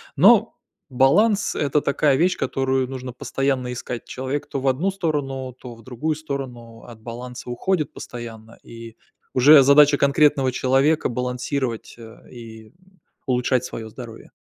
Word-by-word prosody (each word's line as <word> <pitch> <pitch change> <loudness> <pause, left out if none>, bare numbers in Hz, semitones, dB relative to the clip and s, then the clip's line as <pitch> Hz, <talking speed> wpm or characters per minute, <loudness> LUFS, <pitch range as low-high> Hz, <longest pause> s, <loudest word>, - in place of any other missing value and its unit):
Но - - +5 0.3
баланс- 200 - +3
это 145 0 0
такая 140 0 +2
вещь, 180 +6 +1
которую 130 -1 -1
нужно 130 -1 -6
постоянно 130 0 -2
искать. 120 -1 -6
Человек, 130 +3 -4
то 135 - -4
в 135 - -2
одну 155 +10 0
сторону, 145 -8 -3
то 120 -2 -10
в 115 - -17
другую 130 +6 -3
сторону, 125 -6 -7
от 115 -2 -13
баланса 125 +2 -8
уходит 155 +4 -1
постоянно. 115 -2 -10
И 115 -1 -11 0.4
уже 140 +3 +7
задача 145 +1 +6
конкретного 140 -2 +3
человека- 135 +5 +1
балансировать, 125 0 -3
э, 115 -1 -14
и 110 -3 -12 0.5
улучшать 125 -1 0
своё 110 -3 -7
здоровье. 115 0 -11
130 Hz, 135 wpm, -22 LUFS, 120-140 Hz, 0.5 s, уже